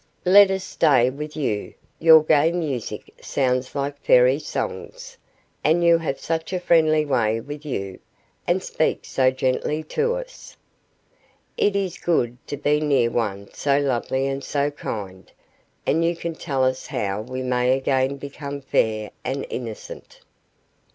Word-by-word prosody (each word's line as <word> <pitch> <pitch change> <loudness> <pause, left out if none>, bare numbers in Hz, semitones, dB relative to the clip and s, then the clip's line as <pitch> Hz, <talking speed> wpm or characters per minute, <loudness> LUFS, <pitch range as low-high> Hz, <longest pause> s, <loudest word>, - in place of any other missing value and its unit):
Let 200 +2 +8
us 190 -1 -1
stay 130 -9 +3
with 150 +3 -7
you; 110 -9 -2 0.2
your 160 -1 +7
gay 155 +1 +4
music 150 -9 -4
sounds 130 0 -1
like 140 0 -3
Fairy 125 +3 +5
songs, - - -5 0.5
and 170 +3 +3
you 170 -1 +5
have 150 -4 -3
such 165 +1 -3
a 185 - 0
friendly 155 -3 +3
way 115 -5 +1
with 145 +5 -8
you, 95 -8 -4 0.5
and - - +1
speak - - -1
so 130 -1 +2
gently 130 +4 -1
to 470 - 0
us. - - -9 1.0
It 205 - +1
is 190 -3 -2
good 125 -9 0
to 145 - -4
be 145 +1 +1
near 135 -6 +2
one 100 -4 -3
so 140 -1 +1
lovely 130 -1 0
and 135 0 -3
so 145 +1 -1
kind; 100 -9 -7 0.5
and 165 +2 +2
you 170 +1 +1
can 170 0 -4
tell 140 -5 -2
us 130 0 0
how 100 +1 -2
we 130 +3 -5
may 125 0 +2
again 135 0 0
become 140 0 -7
fair 110 -5 0
and 135 +2 -3
innocent. 115 -4 -8
140 Hz, 150 wpm, -23 LUFS, 125-160 Hz, 1.0 s, Let